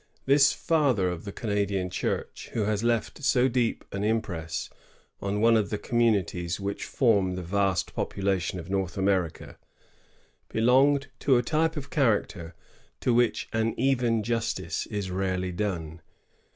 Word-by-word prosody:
This 140 +1 +5
father 135 - +1
of 90 +1 -6
the 100 - -5
Canadian 100 -4 -1
Church, - - -3
who 110 - 0
has 105 +1 -1
left 120 +4 -1
so 130 -1 +4
deep 120 -2 0
an 100 0 -3
impress 95 -7 -2 0.5
on 100 +1 -1
one 115 0 +5
of 105 -3 +1
the 105 - -2
communities 100 -7 0
which 100 0 -4
form 100 -8 +2
the 90 - -5
vast 95 -1 0
population 95 -2 -1
of 85 - -8
North 95 -2 -2
America, 95 -4 -1 0.9
belonged 135 +5 +3
to 135 -3 +3
a 120 - +1
type 160 +6 0
of 140 -1 -6
character 100 - 0 0.5
to 125 - +2
which 120 -1 +2
an 110 0 0
even 120 -4 +2
justice 115 +1 -2
is 100 -3 -4
rarely 95 -1 -1
done. 85 -4 -3
105 Hz, 145 wpm, -27 LUFS, 95-120 Hz, 0.9 s, This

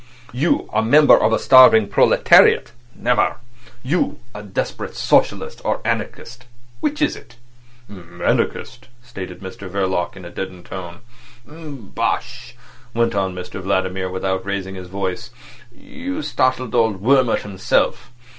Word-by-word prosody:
You—a 125 -5 0
member 145 +7 +6
of 110 - +2
a 110 - +3
starving 125 -5 +7
proletariat—never! 120 +4 +3 0.5
You—a 130 -6 -3
desperate 100 -2 -5
socialist - - +1
or - - -1
anarchist—which 120 - -4
is 300 - +1
it?" - - -15 0.5
"Anarchist," 95 +6 -3 0.2
stated 95 -7 -9
Mr 95 0 -9
Verloc 95 -2 -2
in 95 -2 -11
a 85 - -9
deadened 90 -1 -7
tone. 90 +1 -8 0.4
"Bosh!" 150 - -5 0.4
went 115 0 +1
on 95 -2 -1
Mr 90 +1 -7
Vladimir, 95 0 -1
without 95 0 -2
raising 95 -1 -4
his 90 -1 -9
voice. 100 +4 -4 0.4
"You 275 - -7
startled 130 - 0
old 110 -5 +1
Wurmt 130 -1 +3
himself. 100 +4 -1
105 Hz, 115 wpm, -20 LUFS, 95-125 Hz, 0.5 s, starving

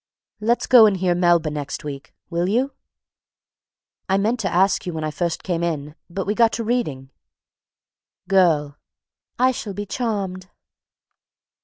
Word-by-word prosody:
_) - - -70 0.4
"Let's 235 +1 +2
go 240 -4 +8
and 200 -2 +1
hear 180 -1 +1
Melba 175 -3 +2
next 145 -2 -5
week, 140 -2 -7 0.2
will 170 +2 0
you? 255 +6 0 1.4
I 190 - +3
meant 220 +5 0
to 190 -5 -1
ask 190 +1 +2
you 175 - -3
when 155 - -3
I 155 - -2
first 170 +2 -2
came 175 -3 -2
in, 150 -4 -3 0.2
but 190 +2 -4
we 205 - 0
got 230 0 +4
to 230 - -2
reading." 155 - -2 1.2
GIRL. 160 -7 +2 0.6
"I 255 +1 +4
shall 215 -5 -6
be 205 +1 -4
charmed." 195 -5 -3
185 Hz, 155 wpm, -22 LUFS, 160-215 Hz, 1.4 s, go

